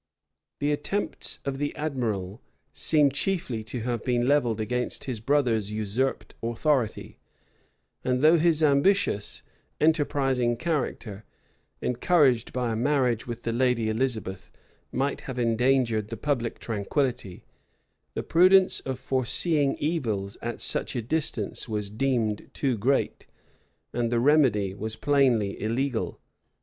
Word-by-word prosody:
The 145 +1 0
attempts 150 +8 -2
of 135 -1 -3
the 145 0 -2
admiral 115 -9 -3 0.3
seem 150 -3 +3
chiefly 140 - -2
to 120 +2 -5
have 120 -1 -2
been 120 -1 +1
levelled 125 -5 +2
against 125 +3 -2
his 125 -5 -4
brother's 115 -5 +1
usurped 110 +5 -2
authority; 120 +1 -1 0.8
and 125 +1 0
though 160 +2 +6
his 160 -1 +3
ambitious, 145 - +2 0.4
enterprising 135 -6 +2
character, 120 - -3 0.6
encouraged 130 -1 +2
by 125 -2 -1
a - - -1
marriage 125 -2 +1
with 120 0 -6
the 115 - -1
lady 120 -2 +1
Elizabeth, 110 -6 -3 0.4
might 140 +2 -1
have 130 -2 -7
endangered 115 -2 +2
the 115 - -6
public 125 -3 -1
tranquillity, 110 -2 -2 0.7
the - - -2
prudence 185 +2 +5
of 130 -1 -4
foreseeing 135 +3 +1
evils 115 - -2
at 120 0 -4
such - - 0
a 120 - -2
distance 125 -5 -2
was 105 -2 -3
deemed 115 -3 -1
too 135 -4 0
great, 125 +6 0 0.7
and 120 -1 -1
the 120 - +2
remedy 120 -8 +3
was 110 +2 -5
plainly 125 -8 +2
illegal. 120 +3 -1
125 Hz, 125 wpm, -26 LUFS, 110-145 Hz, 0.8 s, though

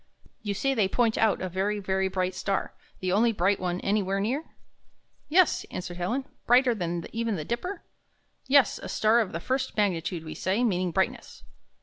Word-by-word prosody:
You 205 -2 -3
see 270 +6 +1
they 215 -7 +2
point 225 +2 +1
out 220 -4 +2
a - - -1
very, 190 +4 -1
very 190 -1 0
bright 185 -1 -1
star, 195 +1 -2 0.3
the 185 -1 -1
only 225 +5 +4
bright 195 -1 +1
one 180 -1 -2
anywhere 195 -1 0
near?" 255 +10 -1 0.8
''Yes," 355 +2 +4
answered 175 -1 -6
Helen, 235 +10 -1 0.2
"brighter 245 +1 +5
than 175 -5 -3
even 230 -2 -1
the 155 -4 -4
Dipper?" 360 - -4 0.6
"Yes, 270 -4 +4
a - - -7
star 220 +2 +3
of 220 -5 0
the 165 - -4
first 260 +6 -2
magnitude, 175 -4 0
we 155 - -6
say, 195 +6 0
meaning 185 -5 +1
brightness. 190 +3 -2
200 Hz, 180 wpm, -27 LUFS, 185-235 Hz, 0.8 s, brighter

